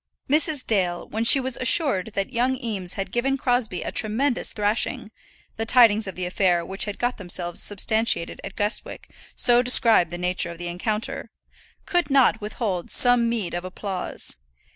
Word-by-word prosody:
Mrs. 300 -1 +1
Dale, 180 -5 -1
when 220 +1 -3
she 270 +4 +5
was 260 -1 -3
assured 255 - 0
that 195 +6 -3
young 250 +2 0
Eames 200 -7 0
had 195 -2 -5
given 270 +4 -1
Crosbie 245 -8 -1
a - - -5
tremendous 240 +4 -1
thrashing 210 +1 -2 0.5
the 225 - -3
tidings 225 -4 +4
of 190 - -7
the 180 - -4
affair 180 -2 0
which 195 +1 -1
had 205 -1 -6
got 245 +1 -2
themselves 175 -2 -3
substantiated 220 -2 0
at 195 - -8
Guestwick 210 +1 -3 0.2
so 240 0 +5
described 230 -7 +5
the 175 - -6
nature 180 0 -1
of 170 - -9
the 175 0 -6
encounter 210 +5 -4 0.6
could 350 -6 -1
not 265 -5 +3
withhold 205 -4 -4
some 245 -2 +5
meed 225 -7 -3
of 175 0 -4
applause. 185 - -5
215 Hz, 165 wpm, -23 LUFS, 185-245 Hz, 0.6 s, she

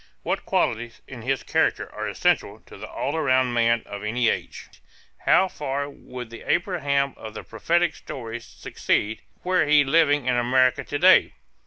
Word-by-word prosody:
What - - -2
qualities 120 +1 -1
in 125 -3 -9
his 135 +3 -1
character - - 0
are - - -4
essential - - 0
to - - -15
the - - -9
all 140 +4 -3
around 130 -5 +2
man 115 0 +2
of 100 0 -8
any 115 +3 +1
age? - - -4 0.6
How 190 - +5
far 140 -4 -3
would 125 -4 -9
the 115 - -9
Abraham 140 -6 0
of 110 0 -9
the - - -7
prophetic 170 -1 0
stories 115 -2 -7
succeed, 110 +2 -2 0.2
were 180 -4 +2
he 150 -1 +6
living 145 -1 +3
in 125 -1 +1
America 125 +1 +2
to 145 - -4
day? 185 +5 +5
130 Hz, 165 wpm, -24 LUFS, 120-150 Hz, 0.6 s, he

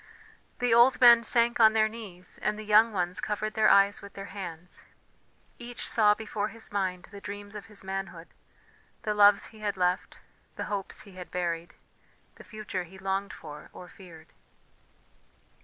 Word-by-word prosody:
The 245 -2 +1
old 240 +3 +5
men 235 -2 +8
sank 235 0 +2
on 220 -1 +7
their 220 -1 +3
knees 205 -5 -9
and 210 0 -1
the 215 - -8
young 215 +2 +5
ones 180 -2 -2
covered 215 0 -3
their 220 - +4
eyes 200 0 +4
with 200 - -12
their 195 0 -9
hands; 180 -3 -9 0.8
each 240 -1 -6
saw 210 -2 +4
before 210 -1 -3
his 225 +1 -6
mind 185 -3 -2
the 200 -1 -10
dreams 205 0 -8
of 210 0 -9
his 210 -3 -9
manhood, 190 -3 -6 0.7
the 210 - -1
loves 205 -1 +5
he 220 - -14
had 205 -2 -3
left, 180 0 -1 0.4
the - - -4
hopes 195 -1 -4
he 200 - -14
had 185 -1 -10
buried, 170 -1 -3 0.6
the - - -12
future 210 -4 -6
he 190 +3 -15
longed 195 +1 -2
for 150 -1 -11
or 180 - -11
feared. 170 -4 -15
205 Hz, 170 wpm, -28 LUFS, 185-215 Hz, 0.8 s, men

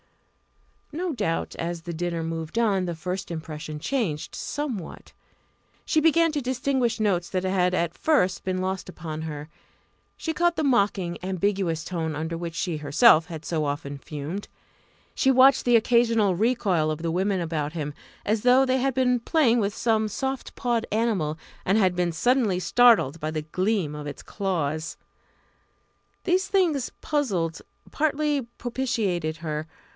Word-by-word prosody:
No 340 +2 -2
doubt, 205 -9 -2
as 170 0 -4
the 170 - -5
dinner 170 0 -2
moved 165 +3 -4
on, 200 -5 +2
this 170 -2 -5
first 185 +3 -4
impression 155 -2 -6
changed 190 - -2
somewhat. 255 - -5 0.7
She 310 - +2
began 330 +1 +4
to 295 -2 -2
distinguish 255 -1 0
notes 185 -5 +1
that 185 -1 -1
had 185 -1 +1
at 170 -1 -1
first 285 -13 +2
been 185 0 -1
lost 185 0 -3
upon 160 -3 -6
her. 150 -2 -6 0.7
She 320 - -3
caught 345 +1 +2
the 315 - -1
mocking, 200 -9 +1
ambiguous 190 -3 -1
tone 160 -4 -3
under 160 +2 -3
which 165 0 -5
she 170 -2 -2
herself 155 - +5
had 160 -3 -8
so 160 -3 -1
often 145 -1 -3
fumed; 150 +8 -6 0.7
she 265 - +2
watched 265 +1 +6
the 245 -1 +5
occasional 230 -4 +3
recoil 195 -7 +1
of 155 +1 -3
the 165 - 0
women 190 +2 0
about 160 -3 -2
him, 150 -3 -4 0.3
as 215 +1 +1
though 250 +3 +5
they 260 0 +1
had 265 0 0
been 250 -1 +2
playing 240 -2 +3
with 205 -1 0
some 220 -2 +1
soft 265 +5 -4
pawed 235 -2 -1
animal, 205 -9 0 0.3
and 195 +3 +2
had 185 -4 +3
been 175 -1 +1
suddenly 215 +2 +2
startled 215 - +4
by 155 - -2
the 155 -1 -3
gleam 185 0 -1
of 150 0 -6
its 145 - -7
claws. 165 -6 -2 1.3
These 370 +1 +1
things 330 -10 +1
puzzled, 190 - -1 0.3
partly 300 -1 +1 0.2
propitiated 220 -11 -1
her. 155 -1 -4
190 Hz, 155 wpm, -25 LUFS, 165-245 Hz, 1.3 s, watched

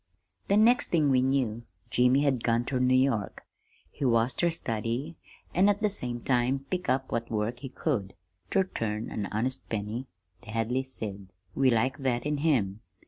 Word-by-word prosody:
"The 200 - +3
next 235 +4 +5
thing 155 -5 +3
we 130 -1 +4
knew 130 -4 0 0.3
Jimmy 125 +3 +4
had 135 -5 +1
gone 115 0 +1
ter 130 0 -1
New 130 0 +4
York. 130 -6 0 0.5
He - - -7
was 115 0 +3
ter 175 - +2
study, 120 +1 -2 0.4
an' 190 +4 +4
at 205 +1 0
the 210 - +3
same 120 -10 -3
time 130 +2 +1
pick 180 -1 -2
up 130 0 0
what 115 0 -2
work 110 +2 -2
he 135 - -7
could, 120 -9 -2 0.3
ter 195 - +3
turn 110 - -4
an 100 -2 -3
honest 125 +6 -3
penny, 110 +4 -3 0.3
the - - -14
Hadleys 125 +4 -1
said. 100 -5 -6 0.3
We 135 -1 +3
liked 130 +4 +1
that 125 -2 0
in 150 0 0
him. 115 -10 +1
125 Hz, 180 wpm, -28 LUFS, 115-140 Hz, 0.5 s, next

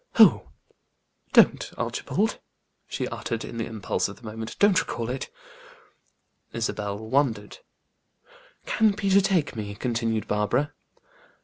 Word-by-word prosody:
"Oh! - - +6 0.8
Don't, - - +5
Archibald," 220 +3 -1 0.5
she - - -3
uttered, 115 -1 -4
in 115 - -8
the 115 - -2
impulse 110 -4 -2
of 100 - -9
the - - -21
moment; 110 0 -6
"don't 205 -4 +5
recall 115 +1 -3
it." 130 - -4 1.2
Isabel 105 -3 -2
wondered. 110 -2 -1 1.1
"Can 215 -2 +2
Peter 200 -1 +3
take 185 -9 +1
me?" 105 -2 -5
continued 115 -1 -1
Barbara. 120 +8 0
115 Hz, 115 wpm, -26 LUFS, 110-145 Hz, 1.2 s, Oh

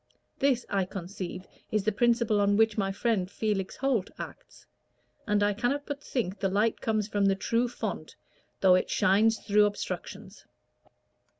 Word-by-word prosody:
This, 265 -3 +2
I 195 -2 0
conceive, 185 0 -6 0.2
is 215 -2 0
the 215 - +1
principle 230 -1 +2
on 205 0 +3
which 220 -1 +3
my 195 -2 0
friend 200 -3 0
Felix 200 -2 -2
Holt 255 -8 0
acts; - - -10 0.6
and 205 -1 +2
I 205 0 +2
cannot 245 +7 -1
but 285 -1 -5
think 205 -6 -3
the 195 - 0
light 210 +4 +1
comes 215 -2 0
from 205 -2 0
the 195 0 +3
true 230 +5 0
fount, 240 - -5 0.5
though 190 -1 +6
it 185 - +2
shines 220 +4 +3
through 210 0 +3
obstructions." 205 - -6
210 Hz, 160 wpm, -28 LUFS, 195-230 Hz, 0.6 s, though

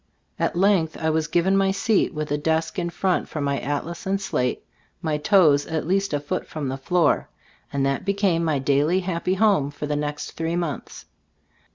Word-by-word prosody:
At - - 0
length 180 -3 +2
I 160 -1 +1
was 155 -1 0
given 175 +4 +2
my 195 0 +3
seat, 200 +2 +1
with 155 -3 -4
a - - +2
desk 160 +3 0
in 170 -1 -1
front 180 +1 0
for 155 - -5
my 140 -1 0
atlas 165 +8 -4
and 195 +1 +1
slate, 125 -10 -2 0.3
my 155 -3 -1
toes 150 -5 +4
at 160 -2 -2
least 195 +3 +1
a 145 - 0
foot 145 +6 -4
from 150 -4 -4
the 135 - -3
floor, 175 +5 +1 0.4
and 140 -1 0
that 135 0 0
became 195 -4 +1
my 155 -3 +1
daily, 145 +7 +2
happy 180 0 -1
home 195 -9 +3
for 145 +1 -6
the 150 0 -1
next 145 0 -3
three 165 +1 -2
months. 170 -5 -4
160 Hz, 195 wpm, -23 LUFS, 145-185 Hz, 0.4 s, toes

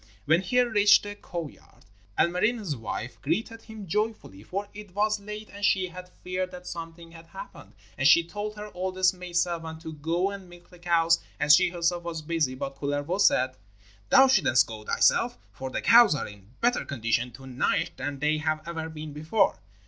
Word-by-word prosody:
When 160 +4 +4
he 245 +7 +1
reached 210 -4 +5
the 205 0 -6
cow 175 -5 -6
yard, 140 - -19 0.3
Ilmarinen's 185 0 +1
wife 115 +1 -6
greeted 225 - -2
him 220 -2 -10
joyfully, 210 - -3
for 195 - -5
it 205 -3 -11
was 215 +1 +1
late 210 +1 -8
and 205 0 -9
she 190 -3 +2
had 180 0 -10
feared 185 0 -2
that 180 -1 -11
something 165 0 -8
had 165 0 -14
happened. - - -11 0.3
And 135 - +4
she 170 +4 +7
told 210 +5 -6
her 210 0 -8
oldest 185 0 +1
maid 180 -1 -9
servant 165 -2 -1
to 160 -1 -6
go 165 +6 -1
and 195 -2 -9
milk 175 0 -16
the 180 - -16
cows 170 -1 +3 0.2
as 150 +1 +7
she 185 +1 +3
herself 175 0 -1
was 165 -2 -5
busy. 150 -5 0
But 135 +1 -5
Kullervo 145 +6 -2
said: 130 -7 +3 0.5
'Thou 265 - +8
shouldst 195 - +4
go 110 -1 -9
thyself, - - +2
for 130 +5 -6
the - - -4
cows 230 -6 +7
are - - -3
in 100 -1 -14
better 240 +1 +2
condition 120 -2 -1
to 135 - -12
night 130 -1 0
than 140 +1 -4
they 150 +2 +1
have 155 0 -2
ever 160 -1 -4
been 155 -1 -8
before.' 155 +9 +1
170 Hz, 190 wpm, -27 LUFS, 150-200 Hz, 0.5 s, Thou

